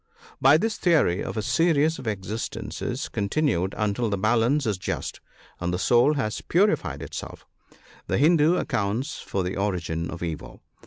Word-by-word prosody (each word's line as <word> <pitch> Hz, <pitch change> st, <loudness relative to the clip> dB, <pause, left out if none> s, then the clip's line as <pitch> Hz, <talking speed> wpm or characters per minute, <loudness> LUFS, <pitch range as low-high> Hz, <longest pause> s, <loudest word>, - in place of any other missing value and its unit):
By 135 Hz, +3 st, +7 dB
this 220 Hz, +5 st, -2 dB
theory 155 Hz, -, +3 dB
of -, -, -5 dB
a 110 Hz, -, -1 dB
series 160 Hz, +1 st, +2 dB
of 130 Hz, -, -8 dB
existences 105 Hz, +1 st, -4 dB
continued 100 Hz, -, 0 dB
until 105 Hz, +2 st, 0 dB
the 100 Hz, -, -1 dB
balance 120 Hz, +7 st, +2 dB
is 105 Hz, -4 st, -1 dB
just, -, -, -4 dB, 0.4 s
and 90 Hz, 0 st, -2 dB
the 90 Hz, -, -1 dB
soul 120 Hz, +9 st, +4 dB
has 110 Hz, -7 st, -2 dB
purified 200 Hz, +5 st, +1 dB
itself, -, -, -8 dB, 0.6 s
the -, -, 0 dB
Hindoo 160 Hz, +3 st, +4 dB
accounts 120 Hz, -, -2 dB
for 95 Hz, -, -3 dB
the 90 Hz, +1 st, -3 dB
origin 85 Hz, -5 st, -2 dB
of 85 Hz, -1 st, -6 dB
evil. 80 Hz, -3 st, -6 dB
110 Hz, 155 wpm, -25 LUFS, 95-150 Hz, 0.6 s, By